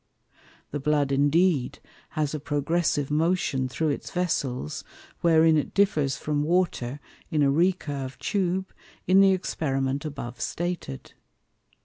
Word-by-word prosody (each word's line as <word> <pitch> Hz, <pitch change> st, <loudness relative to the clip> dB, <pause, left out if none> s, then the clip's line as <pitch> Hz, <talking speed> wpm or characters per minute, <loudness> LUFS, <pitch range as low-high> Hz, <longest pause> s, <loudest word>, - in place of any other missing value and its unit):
The 145 Hz, -, -2 dB
Blood 145 Hz, -1 st, +1 dB
indeed 145 Hz, 0 st, +2 dB, 0.4 s
has 150 Hz, -1 st, 0 dB
a 155 Hz, -, -2 dB
Progressive 145 Hz, 0 st, 0 dB
Motion 150 Hz, -5 st, +1 dB
through 155 Hz, +4 st, -1 dB
its 145 Hz, -, -3 dB
Vessels, 135 Hz, -, -2 dB, 0.4 s
wherein 160 Hz, -1 st, +5 dB
it 150 Hz, -, -2 dB
differs 150 Hz, -, +2 dB
from 150 Hz, +3 st, -1 dB
Water, 150 Hz, -5 st, 0 dB, 0.3 s
in 150 Hz, -2 st, +2 dB
a 140 Hz, -, +4 dB
recurve 145 Hz, -5 st, 0 dB
Tube, 190 Hz, -1 st, -1 dB, 0.3 s
in 190 Hz, +1 st, +6 dB
the 195 Hz, -1 st, +6 dB
Experiment 135 Hz, -6 st, -1 dB
above 140 Hz, -6 st, -6 dB
stated. 175 Hz, -, -4 dB
150 Hz, 120 wpm, -26 LUFS, 140-175 Hz, 0.4 s, in